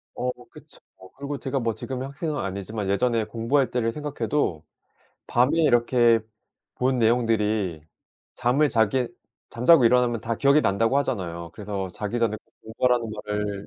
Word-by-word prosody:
어 125 0 -1 0.2
그쵸. - - -14 0.4
그리고 140 +1 -4
제가 135 0 -2
뭐 115 -2 -1
지금은 130 +4 -5
학생은 145 +2 -4
아니지만 100 +1 -4
예전에 115 +3 +1
공부할 115 +4 0
때를 115 -2 0
생각해도 145 - -2 0.6
밤에 130 +7 +2
이렇게 120 -3 +4 0.6
본 130 0 +1
내용들이 110 -7 +1 0.5
잠을 135 +5 +2
자게 115 +1 +1 0.4
잠자고 125 +4 +5
일어나면 120 -1 +3
다 115 +1 -3
기억이 140 +4 +4
난다고 115 +3 +1
하잖아요. 85 -11 -3
그래서 100 -2 -5
자기 105 +5 -3
전에 115 -2 +1 0.3
공부하라는 115 +1 0 0.2
말을 105 -1 -3
115 Hz, 340 characters per minute, -24 LUFS, 105-130 Hz, 0.6 s, 잠자고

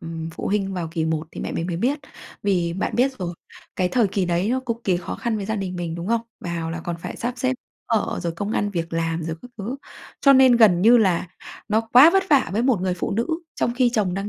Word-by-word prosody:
ừm, 165 0 -6
phụ - - -6
huynh 195 -1 0
vào 170 -3 -3
kỳ 165 -2 -1
1 160 0 -2
thì - - -7
mẹ - - -4
mình 165 - -2
mới 175 -2 -3
biết. 260 - 0 0.4
Vì 180 -4 +1
bạn 190 - -2
biết 260 +3 +3
rồi, 175 -2 -4 0.4
cái 180 -1 +1
thời 235 +2 +2
kỳ 190 0 0
đấy 175 +3 0
nó 255 +2 +1
cực 230 -1 -1
kỳ 185 -3 +2
khó 175 - -5
khăn 235 -2 -2
với 200 -2 -4
gia 220 +1 -1
đình 185 -2 -4
mình, 170 -2 -3
đúng 170 +1 -5
không? 230 0 +2 0.2
Vào 170 -2 -3
là 165 0 -4
còn 170 -1 -3
phải - - -6
sắp 240 +1 -3
xếp 260 +1 +1 0.3
ở, 225 -2 0
rồi 170 -1 -2
công 205 +4 -3
ăn 205 -2 0
việc 170 -3 -4
làm 165 0 -1
rồi 160 0 -4
các 245 - -11
thứ, 225 +7 -4 0.4
cho 275 - +7
nên 260 -2 +6
gần 200 -7 +5
như 235 +4 +7
là 185 -5 +1 0.4
nó 215 +1 +3
quá 245 +7 +7
vất 385 +2 +3
vả 280 -3 +4
với 215 +4 +1
một 250 -6 +2
người 185 -1 0
phụ 180 - -3
nữ 230 +4 0 0.3
trong 235 - -1
khi 250 -1 +3
chồng 195 -5 +1
đang 195 +2 -3
195 Hz, 265 wpm, -23 LUFS, 170-235 Hz, 0.4 s, cho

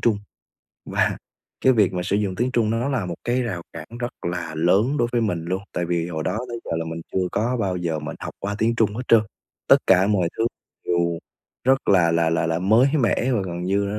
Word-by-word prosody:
Trung. 110 -3 +2 0.7
Và - - +1 0.5
cái 130 - +7
việc 105 -6 +3
mà 90 - -1
sử 100 +2 0
dụng 100 -3 -1
tiếng 120 +4 0
Trung 115 -3 +2
nó 115 +4 0
là 125 -9 -1
một 85 - -4
cái 125 +2 +1
rào 95 -8 -3
cản 80 -1 -8
rất 120 0 -2 0.2
là 85 -2 -4
lớn 100 - +3
đối 120 - +2
với 120 - +2
mình 90 -7 -1
luôn, 95 +3 -2
tại 90 - -2
vì 85 0 -1
hồi 80 -2 -3
đó - - -1
tới 120 -1 -5
giờ - - -7
là 80 - -2
mình 80 0 -5
chưa 90 -1 0
có 120 +4 0
bao 95 -3 0
giờ 85 -3 -2
mình 75 - -6
học - - -6
qua 100 +1 -3
tiếng 115 +2 +2
Trung 110 -3 +2
hết 120 - -3
trơn, 115 - +7 0.5
tất - - +9
cả 95 +1 +5
mọi 95 -5 +2
thứ 115 - +2 0.4
đều 85 -1 +1 0.5
rất 135 +1 +2
là 90 -4 +5
là 85 -1 +2
là 85 0 +1
là 80 0 0
mới 110 +9 +4
mẻ. 125 +1 +1
Và 115 -5 +1
gần 85 0 -5
như 100 +2 +1
á, - - -2
95 Hz, 245 wpm, -23 LUFS, 85-115 Hz, 0.7 s, tất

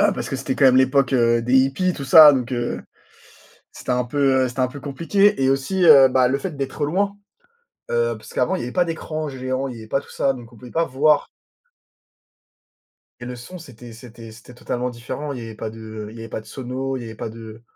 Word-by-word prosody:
heu, - - +4
parce - - -5
que 135 - -3
c'était 130 0 -3
quand 135 - +4
même 130 0 +5
l'époque, 130 0 +3
heu, 120 -1 +3
des 125 +3 +2
hippies, 135 +8 +2
tout 140 - -7
ça, 150 +2 +9
donc, 130 -1 -2
heu, 120 -1 -3 0.9
c'était - - -7
un 125 0 0
peu 130 0 +1
c'était 125 +2 -5
un 125 - +2
peu 140 +2 -10
compliqué 170 +5 +1
et 130 - +3
aussi, 155 +8 0
heu, 140 -5 +8
bah, 130 -1 +3
le 135 +2 0
fait 175 -5 -6
d'être 135 +1 -3
loin, 200 +6 -1 0.7
heu, 120 0 +1
parce - - -14
qu'avant, 125 - +1
il - - -6
y - - -4
avait 125 - -6
pas 180 - +2
d'écran 155 -2 -4
géant, 130 0 -3
il 125 - -8
y - - -10
avait 110 - -12
pas 135 - 0
tout - - -17
ça, 135 - 0
donc 120 -1 -12
on - - -16
pouvait 120 +2 -12
pas 165 0 +1
voir 145 +2 +2 1.9
et 120 - -6
le 125 - -6
son 150 +10 -10
c'était 125 -6 -13
c'était 115 -1 -12
c'était 115 +3 -15
totalement 125 +1 -3
différent, 130 +5 -6
il 125 - -7
y - - -8
avait 115 -1 -8
pas 110 - -5
de 110 -1 -8
il 115 - -12
y - - -9
avait 115 - -8
pas - - -4
de 110 - -18
sono, 130 +3 -5
il 125 - -6
y - - -8
avait 110 -1 -8
pas 110 - -6
de 110 0 -11
130 Hz, 245 wpm, -21 LUFS, 120-140 Hz, 1.9 s, ça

